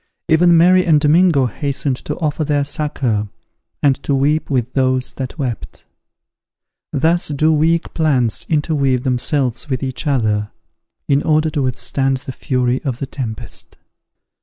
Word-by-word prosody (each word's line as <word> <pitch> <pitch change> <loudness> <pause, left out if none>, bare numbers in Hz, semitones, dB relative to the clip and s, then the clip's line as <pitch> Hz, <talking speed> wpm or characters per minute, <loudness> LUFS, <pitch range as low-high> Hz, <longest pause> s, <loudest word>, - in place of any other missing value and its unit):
Even 170 +1 +5
Mary 180 +2 +5
and 160 -4 +4
Domingo 155 -1 +4
hastened 135 +2 -2
to 150 - -5
offer 155 -1 -1
their 145 -1 +1
succour, 130 -8 -1 0.5
and 140 -1 +2
to 140 - 0
weep 145 +3 +1
with 125 -3 -1
those 130 -1 0
that 130 +2 -6
wept. 125 -6 -5 1.1
Thus 165 +5 +1
do 155 +2 +2
weak 160 +2 +1
plants 135 -8 +1
interweave 145 -5 +1
themselves 130 +1 0
with 130 -2 -2
each 130 +3 -4
other, 110 -6 0 0.6
in 140 0 +2
order 155 0 +1
to 145 - -1
withstand 135 +1 0
the 130 - -8
fury 125 -1 -1
of 130 -5 -2
the 140 - -4
tempest. 120 -4 -7
140 Hz, 140 wpm, -18 LUFS, 130-155 Hz, 1.1 s, Even